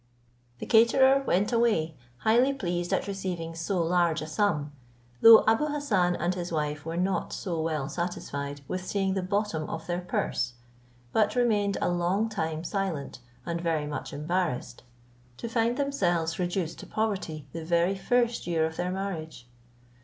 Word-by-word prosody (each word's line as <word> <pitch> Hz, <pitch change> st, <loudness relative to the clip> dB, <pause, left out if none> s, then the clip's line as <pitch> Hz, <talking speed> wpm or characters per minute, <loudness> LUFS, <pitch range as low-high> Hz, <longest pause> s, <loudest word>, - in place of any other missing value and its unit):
The -, -, -6 dB
caterer 265 Hz, +4 st, +5 dB
went 200 Hz, +6 st, +2 dB
away 210 Hz, -10 st, +2 dB, 0.2 s
highly 240 Hz, -, +3 dB
pleased 175 Hz, -7 st, -2 dB
at -, -, +1 dB
receiving 185 Hz, -4 st, -4 dB
so 170 Hz, +2 st, -1 dB
large 170 Hz, -2 st, +2 dB
a -, -, -4 dB
sum, 155 Hz, -4 st, 0 dB, 0.5 s
though 225 Hz, -1 st, +10 dB
Abou 225 Hz, +7 st, +3 dB
Hassan 215 Hz, -13 st, +1 dB
and 175 Hz, +1 st, 0 dB
his 175 Hz, -1 st, -5 dB
wife 150 Hz, -1 st, -2 dB
were 165 Hz, +1 st, -3 dB
not 185 Hz, +1 st, 0 dB
so 170 Hz, -4 st, -3 dB
well 155 Hz, -4 st, -1 dB
satisfied 145 Hz, -4 st, -4 dB
with 185 Hz, 0 st, -3 dB
seeing 195 Hz, 0 st, 0 dB
the 190 Hz, -, -1 dB
bottom 185 Hz, -4 st, -1 dB
of 160 Hz, 0 st, -5 dB
their 175 Hz, +1 st, -2 dB
purse, 175 Hz, -7 st, -1 dB, 0.6 s
but 215 Hz, 0 st, +2 dB
remained 210 Hz, -5 st, +2 dB
a -, -, +2 dB
long 180 Hz, +5 st, +1 dB
time 160 Hz, -6 st, -3 dB
silent, 175 Hz, -8 st, -3 dB, 0.3 s
and 170 Hz, 0 st, -3 dB
very 165 Hz, -3 st, 0 dB
much 145 Hz, -2 st, -5 dB
embarrassed, 155 Hz, -4 st, -2 dB, 0.6 s
to 235 Hz, -, -5 dB
find 230 Hz, +1 st, +1 dB
themselves 175 Hz, -, 0 dB
reduced 175 Hz, -2 st, -2 dB
to -, -, -9 dB
poverty 190 Hz, -9 st, -2 dB
the 165 Hz, -, -5 dB
very 170 Hz, +3 st, +2 dB
first 235 Hz, +3 st, 0 dB
year 165 Hz, -2 st, +2 dB
of 160 Hz, 0 st, -5 dB
their 180 Hz, +1 st, -1 dB
marriage. 175 Hz, -8 st, -5 dB
180 Hz, 160 wpm, -28 LUFS, 160-210 Hz, 0.6 s, though